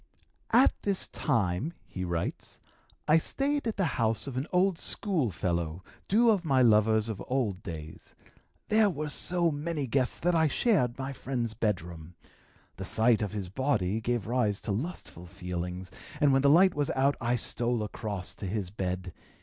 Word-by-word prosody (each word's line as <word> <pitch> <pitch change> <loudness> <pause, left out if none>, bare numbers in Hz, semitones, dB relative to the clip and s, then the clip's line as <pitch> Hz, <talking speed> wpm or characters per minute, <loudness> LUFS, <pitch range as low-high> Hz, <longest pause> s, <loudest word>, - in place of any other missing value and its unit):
"At - - +6
this 200 -2 +1
time," 115 - -1
he 95 - -6
writes, 85 -2 -4 0.5
"I 155 +2 +6
stayed 280 - -1
at 220 - -2
the 195 - +2 0.2
house 110 -1 +1
of 135 - -6
an 130 +5 -2
old 185 -1 +2
school 175 - 0
fellow, 85 -1 -2 0.2
due 230 +3 +4
of 200 -5 +1
my 135 -5 +3
lovers 110 -1 +4
of 110 -3 -5
old 115 -8 -1
days. 80 -4 -9 0.5
There 215 -1 +4
were 155 -3 -4
so 175 +2 +2
many 150 0 -3
guests 130 +1 +1
that 175 +1 +1
I 160 -1 +4
shared 145 - +1
my 135 0 -4
friend's 125 -4 -3
bedroom. 90 -6 -3 0.6
The - - -5
sight 115 0 +3
of 105 -1 -3
his 100 -4 -4
body 110 -3 0
gave 120 -3 -1
rise 110 -4 0
to 110 - -3
lustful 105 - -5
feelings, 90 0 -5 0.3
and 145 -2 +4
when 135 - +4
the 140 - +4
light 180 +5 +6
was 145 -1 -1
out 135 +2 +2
I 120 +1 +1
stole 120 -1 0
across 105 -3 -4
to 100 - -5
his 95 -2 -3
bed. 90 -2 -4
120 Hz, 170 wpm, -29 LUFS, 95-150 Hz, 0.6 s, At